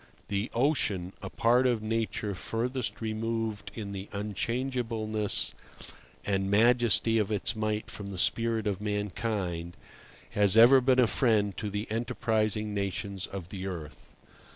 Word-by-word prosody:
The 100 +3 -1
ocean, 110 - +1
a 95 - -5
part 120 +5 +3
of 120 -3 0
Nature 110 -2 -1
furthest 115 +2 -3
removed 110 -1 -2
in 105 -3 -5
the 100 0 -6
unchangeableness 110 +1 -2 0.7
and 95 -1 0
majesty 115 0 +4
of 105 -1 0
its 105 +1 0
might 110 0 -2
from 100 - -6
the 100 -2 -6
spirit 115 +3 +1
of 100 -2 -1
mankind, 105 -4 -2 0.5
has 105 0 +3
ever 125 +4 +8
been 130 0 +3
a 125 - +6
friend 105 -2 +2
to 105 - -3
the 105 +2 -3
enterprising 110 -2 0
nations 100 -1 -3
of 95 -3 -7
the 95 -1 -5
earth. 85 -6 -7
105 Hz, 135 wpm, -29 LUFS, 100-115 Hz, 0.7 s, ever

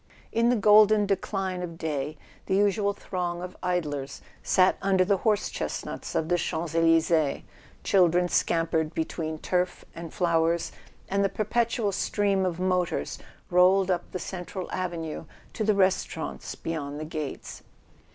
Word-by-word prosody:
In 230 +1 +2
the 245 - +4
golden 210 0 +6
decline 195 -1 -2
of 170 -2 -6
day 150 -2 -3 0.3
the 190 - +1
usual 200 0 +2
throng 180 -3 -4
of 180 0 -7
idlers 150 -7 -2 0.2
sat 185 0 +3
under 190 -1 +3
the 200 +1 +2
horse 210 +1 +1
chestnuts - - -5
of 160 -1 0
the 175 +1 +1
Champs 160 0 -3
Elysees, 165 -2 +3 0.4
children 180 -2 +3
scampered 165 -2 0
between 160 -1 -3
turf 180 +3 -1
and 165 -1 -8
flowers, 170 -1 +1 0.4
and 200 +1 +1
the 195 - +2
perpetual 225 0 0
stream 195 -1 +1
of 175 -1 -3
motors 180 -1 -1 0.3
rolled 185 +2 +5
up 175 -1 -2
the - - -3
central 180 0 -6
avenue 165 -3 -4 0.3
to 220 - -2
the 215 -1 +2
restaurants 185 -4 -1
beyond 145 -3 -4
the 155 - -4
gates. 155 -2 -6
180 Hz, 140 wpm, -27 LUFS, 165-195 Hz, 0.4 s, golden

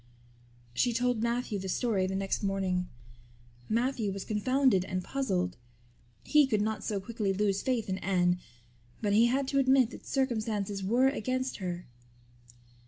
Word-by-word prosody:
She 245 - +2
told 245 -1 +1
Matthew 235 -2 -1
the 190 0 -5
story 195 -2 +1
the 190 - -3
next 195 0 -1
morning. 190 -3 -1 0.8
Matthew 230 -2 0
was 195 0 -5
confounded 250 -1 +2
and 185 -1 -3
puzzled; 185 -10 -1 0.7
he 300 -2 +4
could 215 -5 +1
not 215 -2 -2
so 205 -2 -1
quickly 210 -1 -2
lose 200 0 +1
faith 245 -4 -1
in 190 0 -2
Anne 180 -2 +1 0.6
but 205 -2 0
he 225 +3 +6
had 265 +2 0
to 275 - +2
admit 260 -2 +4
that - - -11
circumstances 215 -6 -1
were 240 +7 +3
against 255 0 -2
her. 180 -2 -4
215 Hz, 150 wpm, -30 LUFS, 190-250 Hz, 0.8 s, he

